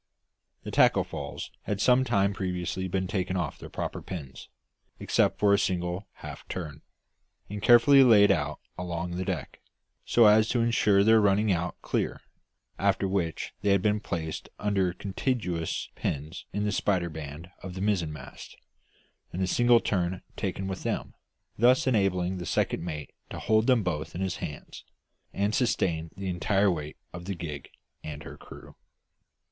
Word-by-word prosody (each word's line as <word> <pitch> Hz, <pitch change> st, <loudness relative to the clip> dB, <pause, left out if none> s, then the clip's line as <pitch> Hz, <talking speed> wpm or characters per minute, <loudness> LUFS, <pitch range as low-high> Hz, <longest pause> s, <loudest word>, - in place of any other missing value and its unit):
The -, -, -6 dB
tackle -, -, +4 dB
falls -, -, -6 dB
had 105 Hz, -2 st, -2 dB
some 125 Hz, +4 st, +4 dB
time 100 Hz, -5 st, +2 dB
previously 95 Hz, -1 st, -3 dB
been 95 Hz, +1 st, -1 dB
taken 95 Hz, -1 st, -2 dB
off 85 Hz, -5 st, -3 dB
their -, -, -9 dB
proper -, -, -4 dB
pins, 70 Hz, -8 st, -8 dB, 0.5 s
except -, -, +2 dB
for 100 Hz, -1 st, +4 dB
a 100 Hz, -, +4 dB
single 90 Hz, +1 st, -1 dB
half -, -, -9 dB
turn, 75 Hz, -4 st, -6 dB, 0.7 s
and 105 Hz, 0 st, -5 dB
carefully 130 Hz, +5 st, +7 dB
laid 105 Hz, -5 st, +7 dB
out 75 Hz, -2 st, -1 dB, 0.2 s
along 85 Hz, -1 st, -3 dB
the 90 Hz, +1 st, -2 dB
deck, 90 Hz, -8 st, -4 dB, 0.4 s
so 120 Hz, -, +4 dB
as 110 Hz, +1 st, +6 dB
to 120 Hz, -, +1 dB
insure 105 Hz, -4 st, +3 dB
their 110 Hz, +1 st, +6 dB
running 105 Hz, +1 st, +3 dB
out 85 Hz, 0 st, -2 dB
clear, -, -, -1 dB, 0.6 s
after 100 Hz, -, +2 dB
which 90 Hz, -5 st, -2 dB
they 100 Hz, -, +1 dB
had 100 Hz, -2 st, +3 dB
been 105 Hz, 0 st, +2 dB
placed 80 Hz, -6 st, -4 dB
under 100 Hz, -3 st, +1 dB
contiguous 95 Hz, -, -2 dB
pins 75 Hz, +5 st, -4 dB
in 105 Hz, -, -2 dB
the 105 Hz, -, 0 dB
spider 90 Hz, -5 st, 0 dB
band 80 Hz, +2 st, -8 dB
of 90 Hz, -1 st, -7 dB
the -, -, -5 dB
mizzenmast, 90 Hz, -7 st, -3 dB, 0.8 s
and 95 Hz, -, -2 dB
a -, -, +2 dB
single 120 Hz, +4 st, +4 dB
turn 90 Hz, -3 st, -1 dB
taken 95 Hz, -1 st, -3 dB
with 95 Hz, -1 st, -4 dB
them, -, -, -3 dB, 0.5 s
thus 125 Hz, +3 st, +5 dB
enabling 95 Hz, -6 st, +1 dB
the 90 Hz, -, -5 dB
second -, -, 0 dB
mate 75 Hz, -4 st, -6 dB, 0.2 s
to -, -, -7 dB
hold 110 Hz, +1 st, +2 dB
them 125 Hz, -5 st, +4 dB
both 80 Hz, -4 st, -3 dB
in 90 Hz, -, -4 dB
his 95 Hz, -2 st, -1 dB
hands, 75 Hz, -4 st, -7 dB, 0.5 s
and 100 Hz, +2 st, 0 dB
sustain 85 Hz, -10 st, 0 dB
the 100 Hz, 0 st, -4 dB
entire 95 Hz, +2 st, +2 dB
weight 75 Hz, -3 st, -5 dB, 0.2 s
of 90 Hz, 0 st, -8 dB
the 100 Hz, 0 st, -3 dB
gig 75 Hz, -5 st, -7 dB, 0.3 s
and 75 Hz, -1 st, -7 dB
her -, -, -9 dB
crew. -, -, -13 dB
95 Hz, 165 wpm, -28 LUFS, 85-105 Hz, 0.8 s, carefully